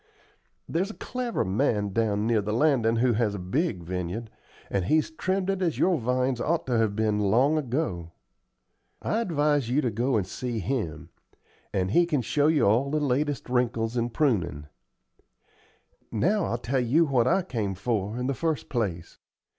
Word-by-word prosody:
There's 185 +5 -1
a 220 - -8
clever 250 -2 -3
man 105 -1 0
down 105 -2 +1
near 115 -2 +2
the 105 +1 -3
landin' 120 -4 +3
who 120 +1 +3
has 105 -2 0
a - - -3
big 95 - -1
vineyard, 90 +6 -4 0.4
and 95 -3 0
he's 155 - +2
trimmed 185 +3 -1
it 195 -1 -3
as 170 -4 0
your 180 -4 +2
vines 125 +1 0
ought 170 +1 0
to 125 -2 0
have 110 -3 +1
been 110 -1 +1
long 120 +9 +3
ago. 125 - -2 0.9
I'd 225 0 0
advise 145 -5 +1
you 130 +4 +2
to 125 - 0
go 120 +4 +1
and 100 - 0
see 120 +5 -4
him, 85 - -3 0.6
and 95 -1 -1
he 175 +7 +4
can 150 -7 0
show 145 +5 +2
you 155 -2 +3
all 115 +7 +3
the 155 +2 0
latest 145 0 -1
wrinkles 120 -2 0
in 120 0 0
prunin'. 100 - 0 1.4
Now, 185 - +1
I'll 120 - -1
tell 125 +3 -1
you 130 +8 +3
what 130 -5 +2
I 190 +8 +3
come 110 - -3
for, 105 +1 -2
in 125 - -2
the 135 - 0
first 160 +1 -2
place. 95 -9 -3
120 Hz, 175 wpm, -26 LUFS, 105-150 Hz, 1.4 s, he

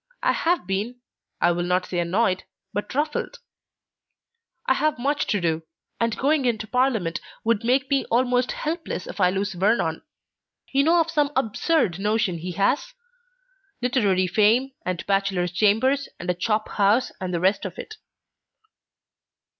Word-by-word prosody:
I - - +4
have 345 - 0
been, 200 +6 -2 0.4
I 175 - +4
will 175 0 -1
not 180 +1 +1
say 175 - -3
annoyed, 185 +2 +1 0.3
but 205 +5 -4
ruffled. 300 - -1 1.3
I - - +4
have 310 0 0
much 280 +4 0
to 205 - +1
do, 165 -2 0 0.4
and 230 -1 0
going 285 0 +2
into 220 -3 0
Parliament 225 -8 0 0.2
would 230 -1 +1
make 255 +3 +2
me 275 -1 +2
almost 245 +1 +1
helpless 320 - -4
if - - -8
I 180 - +5
lose 195 +2 -2
Vernon. 180 -3 +1 0.7
You 275 +1 +3
know 340 +2 +5
of 330 0 -2
some 295 -3 +1
absurd 225 - +1
notion 210 -4 0
he 180 +2 -5
has? 255 - 0 0.8
literary 210 -7 +2
fame, 220 +8 +3
and 180 -2 -3
bachelor's 195 -3 0
chambers, 225 +9 +2
and 175 - -7
a - - 0
chop 215 +4 -1
house, 210 +5 +2
and 185 -1 -3
the 170 - -1
rest 190 +3 +2
of 190 -4 -6
it." 435 - -8
215 Hz, 155 wpm, -24 LUFS, 185-265 Hz, 1.3 s, I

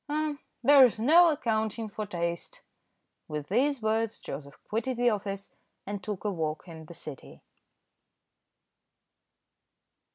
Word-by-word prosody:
"Ah! 300 0 -1 0.3
there's 260 -4 +7
no 330 +9 +7
accounting 220 -5 -1
for 210 0 -5
taste." 170 -2 -4 0.6
With 150 -1 -5
these 260 +4 +1
words 220 0 0
Joseph 140 0 -8
quitted 230 +3 -2
the 245 0 +4
office, 200 -1 -4 0.3
and 205 0 -4
took 210 -3 -5
a 205 - +1
walk 160 -2 -3
in 160 -2 -10
the 170 - -10
City. 150 -4 -10
215 Hz, 120 wpm, -29 LUFS, 170-245 Hz, 0.6 s, there's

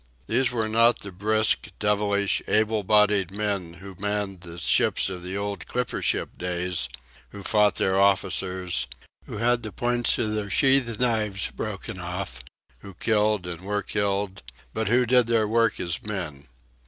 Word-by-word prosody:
These 125 +3 +2
were 115 -3 -1
not 115 +2 +3
the 100 - -7
brisk, 110 +4 +2
devilish, 100 -1 +1
able 110 0 +2
bodied 105 -2 +4
men 100 -4 -3
who 95 +2 -11
manned 100 -2 -2
the 85 -1 -10
ships 90 - +2
of 90 -1 -6
the 90 +2 -4
old 100 0 -4
clipper 125 -1 -2
ship - - -1
days; 90 0 -2 0.4
who 100 -1 -10
fought 105 0 +3
their 95 0 +2
officers, 95 -7 +1 0.4
who - - -6
had 120 +2 +2
the 110 - -6
points 120 +3 +1
of 110 -1 -1
their 105 -1 -2
sheath 130 +2 +3
knives 110 -5 0
broken - - -5
off, - - -5 0.4
who 100 -2 -12
killed 105 -1 +1
and 85 -1 -6
were 100 +1 -2
killed, 100 -1 -1 0.3
but 110 - -2
who 125 +3 +3
did 125 -1 +4
their 115 -2 +2
work 115 +1 +2
as 85 -1 -2
men. 85 -10 -5
105 Hz, 160 wpm, -25 LUFS, 95-110 Hz, 0.4 s, bodied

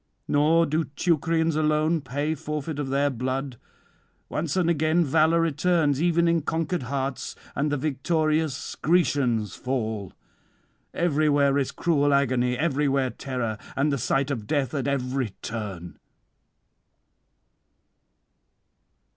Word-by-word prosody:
Nor 160 +3 +4
do 155 +2 0
Teucrians 165 +2 0
alone 155 +1 +2
pay 145 +5 -2
forfeit 150 0 -4
of 140 -2 -2
their 140 +1 +1
blood; 130 0 -3 0.7
once 155 +2 -2
and 180 -3 +2
again 160 +1 +2
valour 160 +3 +3
returns 155 -2 +1
even 170 0 +3
in 170 -1 +2
conquered 165 +3 -1
hearts, 135 0 -3 0.2
and 145 +1 0
the 145 - +1
victorious 155 +1 -1
Grecians 135 - +1
fall. 110 -7 -3 0.8
Everywhere 145 -4 +2
is 135 - -1
cruel 145 -4 +2
agony, 125 -2 +1
everywhere 140 -4 +1
terror, 115 -3 -4 0.2
and 140 +2 +1
the 140 - -1
sight 135 +4 0
of 110 -6 -4
death 140 -4 0
at 140 -2 -2
every 130 -4 -1
turn. 100 -6 -6
145 Hz, 115 wpm, -25 LUFS, 130-160 Hz, 0.8 s, Nor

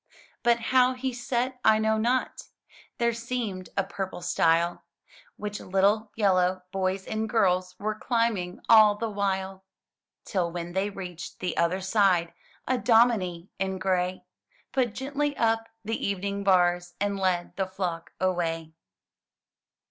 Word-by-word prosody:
But 235 -1 +3
how 255 0 +5
he 260 0 -3
set, 250 +1 -2
I 220 0 +6
know 220 0 +1
not. 245 +3 -1 0.5
There 235 0 +1
seemed 230 -6 -4
a 195 - +3
purple 190 -2 -5
stile 170 -1 +2 0.5
Which 210 0 -5
little 200 +3 +1
yellow 185 -3 +2
boys 190 0 -1
and 220 +1 -2
girls 185 -5 +1
Were 215 +1 -2
climbing 215 -5 -1
all 215 -2 +7
the 225 +1 -3
while. 190 -1 -2 0.6
Till 180 -4 -1
when 175 0 -5
they 190 +2 0
reached 180 -4 -8
the 180 - -2
other 170 +3 +1
side, 190 -3 +2 0.3
A 255 -1 +1
dominie 205 -6 +2
in 190 0 -1
gray 185 -1 -1 0.5
Put 250 -5 0
gently 285 +2 -2
up 225 0 +1 0.2
the 225 +2 -3
evening 200 0 -2
bars, 175 -2 +2
And 200 -1 -1
led 180 -2 0
the 190 -1 -1
flock 180 -3 -4
away. 165 -3 -1
195 Hz, 135 wpm, -27 LUFS, 180-225 Hz, 0.6 s, all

